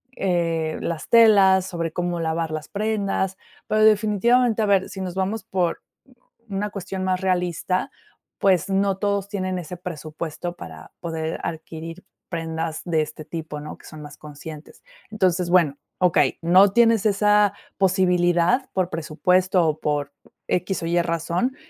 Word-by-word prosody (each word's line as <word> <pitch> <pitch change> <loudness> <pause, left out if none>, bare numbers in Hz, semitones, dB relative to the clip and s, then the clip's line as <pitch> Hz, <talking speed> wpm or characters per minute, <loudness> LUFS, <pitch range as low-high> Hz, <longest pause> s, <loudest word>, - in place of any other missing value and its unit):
eh, 165 -4 0
las 165 -2 -4
telas, 200 -5 +6
sobre 170 -3 -3
cómo 175 -1 -2
lavar 160 0 -1
las 155 -1 -5
prendas, 200 -3 -1 0.3
pero 215 0 +2
definitivamente, 220 +2 +3
a - - +2
ver, 195 -2 +2
si 190 - -7
nos 185 -1 -5
vamos 195 +3 -2
por 185 -5 -1 0.7
u 195 - -5
una 210 +1 -1
cuestión 190 -1 -5
más 185 -1 0
realista, 180 0 0 0.5
pues 190 -2 +2
no 195 0 +1
todos 200 -1 -1
tienen 185 -2 -3
ese 180 +1 -7
presupuesto 165 0 -6
para 80 -2 -11
poder 160 -1 -3
adquirir 165 +2 -7 0.3
prendas 165 -1 -3
de 165 -3 +1
este 155 0 -7
tipo, 155 -1 -6
¿no? 150 - -8
Que - - -17
son 155 -1 -10
más 145 -1 -10
conscientes. 150 +1 -11 0.3
Entonces, 185 -4 +1
bueno, 170 -6 +4 0.2
okey, 180 -2 +2
no 190 +4 +6
tienes 230 -2 +4
esa 210 0 +3 0.2
posibilidad 180 +4 +2
por 185 -2 0
presupuesto 180 +3 +1
o 155 0 -1
por 145 -1 -1 0.4
equis 180 +1 -1
o 165 - -2
ye 175 +1 +2
razón, 170 - -1
180 Hz, 150 wpm, -23 LUFS, 165-195 Hz, 0.7 s, telas